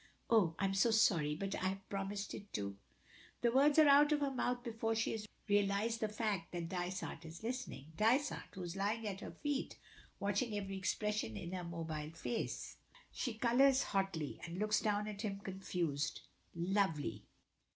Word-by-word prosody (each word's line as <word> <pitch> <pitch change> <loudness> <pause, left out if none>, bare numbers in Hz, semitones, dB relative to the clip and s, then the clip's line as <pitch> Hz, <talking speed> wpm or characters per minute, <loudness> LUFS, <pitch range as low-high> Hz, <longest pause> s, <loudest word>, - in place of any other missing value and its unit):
"Oh! 190 -8 +5
I 195 - +1
am 195 - +1
so 195 +4 +4
sorry, 170 -9 +4
but 195 +4 -3
I 185 - 0
have 195 0 -4
promised 200 0 -3
it 205 - -8
to 100 -1 -2 0.3
" - - -23
The 235 - +4
words 280 +4 +5
are 310 -1 +8
out 290 +1 +7
of 295 -1 +3
her 280 -1 +1
mouth 245 -1 -1
before 225 -1 -1
she 225 - +1
has 215 -1 -4 0.2
realized 205 +2 +2
the 220 - 0
fact 210 -6 -2
that 170 -1 -3
Dysart 180 -2 -3
is 165 +4 -9
listening 235 - -4
Dysart, 255 +7 +2
who 185 - -5
is 175 +1 -5
lying 210 +3 0
at 195 -2 -3
her - - -5
feet, 290 -2 -3 0.4
watching 205 +2 0
every 195 -1 -3
expression 205 - -1
in 170 - -5
her 185 -1 -3
mobile 160 -3 -4
face. 235 - -3 0.3
She 245 -4 -2
colors 255 +4 +5
hotly, 190 -7 -1
and 170 +1 -5
looks 215 +2 +2
down 210 -1 0
at 205 -1 -5
him 205 -3 -2
confused, 175 -7 -2 0.3
lovely. 170 - 0
200 Hz, 180 wpm, -37 LUFS, 175-225 Hz, 0.4 s, are